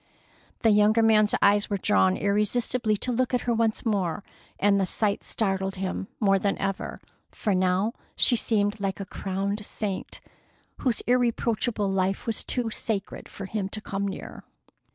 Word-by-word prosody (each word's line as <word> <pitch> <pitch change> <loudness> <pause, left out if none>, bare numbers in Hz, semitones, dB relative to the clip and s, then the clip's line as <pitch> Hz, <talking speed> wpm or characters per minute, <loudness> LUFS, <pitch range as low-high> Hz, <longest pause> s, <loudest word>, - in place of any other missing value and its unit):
The 225 - +4
younger 210 +2 +4
man's 215 -1 +4
eyes 205 0 +4
were 200 - 0
drawn 95 - +2
irresistibly 210 +2 0
to 250 - 0
look 250 +1 +1
at 245 - 0
her 240 - 0
once 225 0 0
more, 200 -3 0 0.4
and 200 0 +3
the - - +2
sight 205 +2 0
startled 195 -2 -1
him 190 0 -3
more 195 -3 +3
than 200 +1 0
ever, 195 -1 -3 0.3
for 210 - -1
now 185 +4 +1 0.2
she 245 - +5
seemed 210 -2 +1
like 195 -1 -2
a 195 - -4
crowned 195 +2 -3
saint, 200 -2 -4 0.6
whose 250 -4 0
irreproachable 235 -3 +1
life 190 0 0
was 225 -2 0
too 240 -3 -1
sacred 205 -3 -4
for 195 - -8
him 195 -1 -3
to 215 - -2
come 200 -1 -3
near. 195 - -7
205 Hz, 160 wpm, -26 LUFS, 195-225 Hz, 0.6 s, she